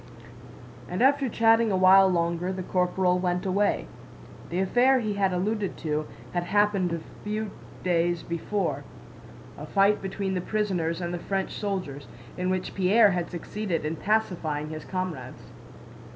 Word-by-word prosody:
And 180 Hz, +7 st, 0 dB
after 275 Hz, -1 st, +3 dB
chatting 225 Hz, 0 st, +4 dB
a 190 Hz, -, +2 dB
while 190 Hz, +1 st, +7 dB
longer, 170 Hz, 0 st, 0 dB
the 190 Hz, -1 st, -4 dB
corporal 180 Hz, 0 st, +1 dB
went 180 Hz, +1 st, -1 dB
away. 200 Hz, +2 st, +1 dB, 0.6 s
(The 175 Hz, -, -3 dB
affair 245 Hz, +8 st, +4 dB
he 215 Hz, -3 st, -2 dB
had 195 Hz, -1 st, +1 dB
alluded 200 Hz, +2 st, -1 dB
to 155 Hz, -1 st, -2 dB, 0.3 s
had 175 Hz, 0 st, -1 dB
happened 205 Hz, -2 st, +2 dB
a 170 Hz, -1 st, -3 dB, 0.2 s
few 215 Hz, 0 st, -3 dB, 0.3 s
days 175 Hz, -1 st, +1 dB
before—a 180 Hz, +4 st, -6 dB
fight 200 Hz, +1 st, +3 dB
between 195 Hz, 0 st, -3 dB
the 180 Hz, -, -1 dB
prisoners 180 Hz, -5 st, -1 dB
and 175 Hz, 0 st, -3 dB
the 175 Hz, -, -3 dB
French 195 Hz, +1 st, -2 dB
soldiers, 180 Hz, -9 st, -4 dB, 0.3 s
in 180 Hz, 0 st, -2 dB
which 185 Hz, 0 st, -2 dB
Pierre 200 Hz, +3 st, +5 dB
had 175 Hz, -2 st, -2 dB
succeeded 180 Hz, -1 st, -3 dB
in 155 Hz, +2 st, -2 dB
pacifying 165 Hz, -7 st, -1 dB
his 155 Hz, -1 st, -7 dB
comrades.) 170 Hz, -9 st, -5 dB
185 Hz, 145 wpm, -26 LUFS, 175-205 Hz, 0.6 s, while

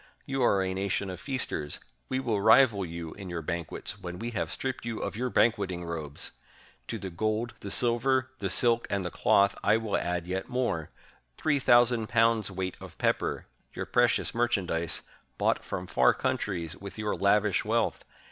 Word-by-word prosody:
You 135 Hz, -1 st, -2 dB
are 100 Hz, -5 st, +4 dB
a 95 Hz, 0 st, -1 dB
nation 95 Hz, 0 st, -1 dB
of 90 Hz, -, -7 dB
f -, -, -14 dB
casters: 125 Hz, -, -2 dB, 0.3 s
we 130 Hz, -, 0 dB
will 115 Hz, -6 st, 0 dB
rival 110 Hz, -2 st, +6 dB
you 85 Hz, -2 st, -6 dB
in 100 Hz, -2 st, -8 dB
your 85 Hz, -2 st, -4 dB
banquets 85 Hz, 0 st, -4 dB
when 90 Hz, 0 st, -6 dB
we 115 Hz, +4 st, -4 dB
have 105 Hz, -, -2 dB
stripped 130 Hz, -1 st, -3 dB
you 115 Hz, -1 st, -3 dB
of -, -, -4 dB
your 125 Hz, +3 st, -1 dB
banquet 110 Hz, -5 st, +3 dB
ing 90 Hz, -1 st, -5 dB
robes! 80 Hz, -4 st, -5 dB, 0.6 s
To 115 Hz, -, -3 dB
the 95 Hz, -2 st, -6 dB
gold, 110 Hz, +6 st, -1 dB
the 100 Hz, -, -6 dB
silver, 130 Hz, +4 st, +2 dB
the 95 Hz, -, -1 dB
silk, 120 Hz, +4 st, +2 dB
and 100 Hz, -2 st, -1 dB
the 90 Hz, -, -3 dB
cloth 100 Hz, 0 st, +3 dB
I 110 Hz, -, +4 dB
will 110 Hz, -3 st, -2 dB
add 90 Hz, -1 st, -1 dB
yet 95 Hz, +1 st, -3 dB
more 120 Hz, -11 st, -1 dB, 0.2 s
— -, -, -36 dB
three 150 Hz, -2 st, +1 dB
thousand 120 Hz, -3 st, +4 dB
pounds' 115 Hz, -3 st, +3 dB
weight 95 Hz, -1 st, -4 dB
of -, -, -11 dB
pepper, -, -, 0 dB, 0.3 s
your -, -, -3 dB
precious -, -, +2 dB
merchandise, 100 Hz, -9 st, 0 dB, 0.3 s
bought -, -, +1 dB
from 90 Hz, -, -4 dB
far 65 Hz, -7 st, +4 dB
countries 85 Hz, -6 st, -2 dB
with 100 Hz, 0 st, -9 dB
your 105 Hz, -1 st, -1 dB
lavish 100 Hz, -2 st, +3 dB
wealth 115 Hz, +1 st, 0 dB
100 Hz, 185 wpm, -29 LUFS, 90-115 Hz, 0.6 s, rival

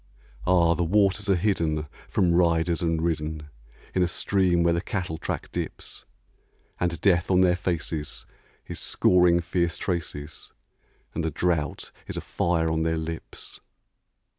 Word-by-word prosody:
Ah! 85 Hz, -2 st, +4 dB
the 85 Hz, +1 st, 0 dB
waters 100 Hz, +3 st, +2 dB
are 95 Hz, -, +5 dB
hidden 85 Hz, -5 st, 0 dB, 0.2 s
from 90 Hz, -2 st, +2 dB
riders 85 Hz, 0 st, +2 dB
and 80 Hz, -1 st, 0 dB
ridden 75 Hz, -2 st, -2 dB, 0.4 s
In 95 Hz, -, +1 dB
a 90 Hz, -, +3 dB
stream 90 Hz, -1 st, +2 dB
where 85 Hz, 0 st, +3 dB
the 85 Hz, -, 0 dB
cattle 90 Hz, -5 st, -3 dB
track -, -, -4 dB
dips; -, -, -6 dB, 0.7 s
And 85 Hz, -2 st, -1 dB
Death 90 Hz, -3 st, +3 dB
on 95 Hz, -1 st, +4 dB
their 90 Hz, -1 st, +4 dB
faces 85 Hz, -4 st, -3 dB, 0.4 s
is -, -, -6 dB
scoring 90 Hz, -1 st, +4 dB
fierce 85 Hz, 0 st, -1 dB
traces, 80 Hz, -4 st, -4 dB, 0.6 s
And -, -, -2 dB
the 80 Hz, -, 0 dB
drouth 80 Hz, -2 st, -1 dB, 0.2 s
is -, -, -5 dB
a -, -, -2 dB
fire 80 Hz, -2 st, 0 dB
on 80 Hz, 0 st, 0 dB
their 80 Hz, 0 st, 0 dB
lips. 80 Hz, 0 st, -7 dB
85 Hz, 145 wpm, -26 LUFS, 80-90 Hz, 0.7 s, are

